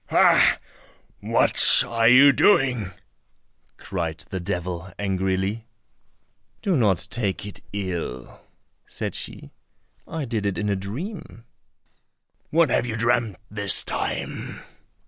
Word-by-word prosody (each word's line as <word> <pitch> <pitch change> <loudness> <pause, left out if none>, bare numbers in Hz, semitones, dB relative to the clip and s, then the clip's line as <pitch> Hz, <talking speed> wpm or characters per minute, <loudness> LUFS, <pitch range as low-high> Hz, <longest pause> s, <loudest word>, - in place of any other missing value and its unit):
"Ha! - - +4 0.6
what - - +5
are 115 -1 +1
you 135 +4 +7
doing?" 125 - +2 0.9
cried 85 -4 -5
the 95 - -3
devil 90 0 -5
angrily. 95 +3 -2 1.0
"Do 195 -4 +1
not 105 - +1
take 100 -5 -2
it 105 - -9
ill," 90 -11 -5 0.5
said - - -5
she, - - -7 0.6
"I 160 -3 -4
did 110 -4 -2
it 100 - -3
in 105 0 -2
a 100 - +1
dream." 115 - -7 1.1
"What 165 -4 +2
have 120 - +1
you 110 - -3
dreamt 115 -2 0 0.2
this 100 -2 +3
time?" - - -5
105 Hz, 110 wpm, -23 LUFS, 95-120 Hz, 1.1 s, you